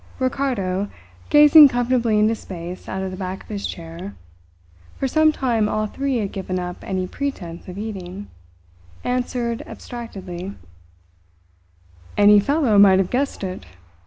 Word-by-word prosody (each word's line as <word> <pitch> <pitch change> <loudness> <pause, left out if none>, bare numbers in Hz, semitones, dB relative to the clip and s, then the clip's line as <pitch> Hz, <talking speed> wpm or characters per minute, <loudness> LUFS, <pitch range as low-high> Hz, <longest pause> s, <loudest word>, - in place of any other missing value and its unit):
Ricardo, 215 -8 -1 0.4
gazing 295 0 +9
comfortably 245 -3 +1
into 215 +1 +3
space 180 -4 -8
out 190 0 -3
of 190 - -4
the 185 - -7
back 185 0 -5
of - - -22
his 205 -2 -3
chair 170 +3 -8 0.8
for 270 - -1
some 315 +3 +4
time 235 -7 0
all 215 0 0
three 270 +4 -2
had 205 -4 -2
given 185 -1 -4
up 180 -1 -4
any 185 -1 -2
pretence 180 -8 -5
of 180 +1 -8
eating 200 -2 -6 0.8
answered 245 -2 -2
abstractedly: 195 -6 -8 1.6
"Any 205 0 +7
fellow 255 -2 +2
might 195 -2 +7
have 190 -1 0
guessed 270 -3 -1
it!" 185 - -5
205 Hz, 135 wpm, -22 LUFS, 185-250 Hz, 1.6 s, gazing